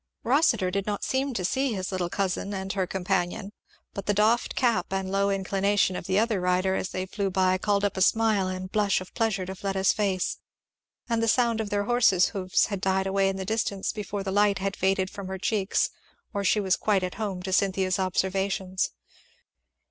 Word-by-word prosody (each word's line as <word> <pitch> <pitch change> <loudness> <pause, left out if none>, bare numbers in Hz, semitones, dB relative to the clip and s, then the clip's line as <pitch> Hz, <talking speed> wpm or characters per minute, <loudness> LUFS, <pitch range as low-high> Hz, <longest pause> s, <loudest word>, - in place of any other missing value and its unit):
Rossitur 235 - +2
did 200 +1 -2
not 205 -1 -2
seem 270 +1 0
to 185 - -1
see 265 +5 0
his 185 -2 -3
little 180 -2 -2
cousin 195 +1 -2
and 190 0 -4
her 190 -2 -1
companion; 190 +1 -2 0.4
but 200 - -6
the 205 - +2
doffed 220 +3 +2
cap 235 -8 +1
and 190 -1 -2
low 200 0 +2
inclination 195 0 +1
of - - -6
the 190 0 +1
other 215 -3 +1
rider 180 +1 +1
as 190 - -2
they 185 0 -3
flew 200 +1 -2
by 185 0 +2
called 205 0 +1
up 205 - -1
a 190 - -2
smile 215 -1 +3
and 185 0 -5
blush 210 -2 +2
of 185 - -11
pleasure 215 -5 0
to 190 - -5
Fleda's 195 0 +1
face; 195 -4 -1 0.7
and 230 -2 0
the 230 - +1
sound 230 -1 +2
of 210 - -4
their 205 0 0
horses' 220 -5 +3
hoofs 185 -3 +1
had 200 -3 -4
died 190 0 +1
away 195 0 +2
in 195 - -2
the 190 0 -4
distance 200 -2 -1
before 205 -1 -4
the 195 - -3
light 205 0 +3
had 195 +1 -2
faded 190 0 0
from 200 -2 -7
her 190 0 -4
cheeks 195 0 0 0.4
or 200 -1 -1
she 205 +2 +3
was 190 -2 +2
quite 200 -3 +1
at 180 - -3
home 190 -4 -3
to 190 0 -3
Cynthia's 190 -1 +1
observations. 190 0 0
195 Hz, 205 wpm, -26 LUFS, 190-205 Hz, 0.7 s, smile